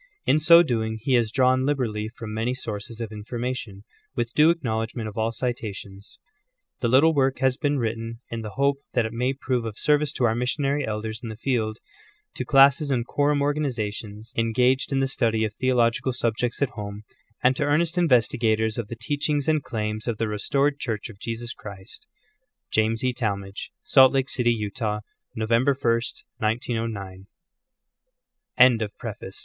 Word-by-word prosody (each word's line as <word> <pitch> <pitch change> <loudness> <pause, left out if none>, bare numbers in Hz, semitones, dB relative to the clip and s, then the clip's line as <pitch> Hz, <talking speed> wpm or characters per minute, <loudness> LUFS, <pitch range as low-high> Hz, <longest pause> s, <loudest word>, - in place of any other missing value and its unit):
In 155 - +4
so 170 +2 +8
doing 110 -6 -1
he 130 +4 -1
has 120 -3 +3
drawn 130 0 +3
liberally 120 -7 -1
from 115 -2 -8
many 115 +3 -1
sources 110 -2 -6
of 115 -2 -5
information, 115 -1 -5 0.3
with 120 0 -2
due 155 +2 +6
acknowledgment 115 -7 -1
of 105 - -8
all 110 0 0
citations. 105 -5 -5 0.6
The 120 - 0
little 140 +7 +5
work 135 -2 +2
has 130 0 +2
been 145 +1 0
written 115 -1 -3
in 115 -1 -3
the 105 -2 -7
hope 140 0 +2 0.2
that 120 -2 +2
it 110 - -4
may 125 +3 0
prove 130 -3 -2
of 110 -2 -6
service 150 -1 +2
to 130 - -2
our 115 -2 +4
missionary 135 +4 0
elders 110 0 -3
in 115 - -6
the 110 - -6
field, 115 -4 -1 0.6
to - - -3
classes 140 +2 +5
and 125 -4 0
quorum 145 +1 +1
organizations 115 -6 -3
engaged 125 +4 +2
in 135 0 +1
the - - +2
iv. 135 - 0
t>REFACE. - - -2
study 110 -1 +1
of 110 - -4
theological 125 0 +1
subjects 120 +2 -1
at 140 - -1
home, 105 0 -7 0.4
and 130 +1 +4
to 150 - 0
earnest 155 +3 +2
investi 135 -7 +3
gators 110 0 +1
of 115 - -3
the 115 - -6
teachings 145 +3 -1
and 155 -1 +2
claims 110 -2 -4
of 115 -3 -1
the 115 - -1
restored 140 +7 0
Church 115 -1 -3
of 100 - -18
Jesus 120 +1 -5
Christ. 100 -2 -11 0.6
James 110 +2 +1
E. 125 0 +1
Talmage. 100 -4 -3
Salt 130 -2 +6
Lake 135 -1 0
City, 120 -2 +2
Utah. 105 -1 -2 0.3
November 115 +5 +2
1, 115 -2 +2 0.4
1909. 110 -4 -3 1.3
Contents. 115 -5 +5
CHAPTER 110 -5 -6
I. - - -7
120 Hz, 175 wpm, -25 LUFS, 110-135 Hz, 1.3 s, so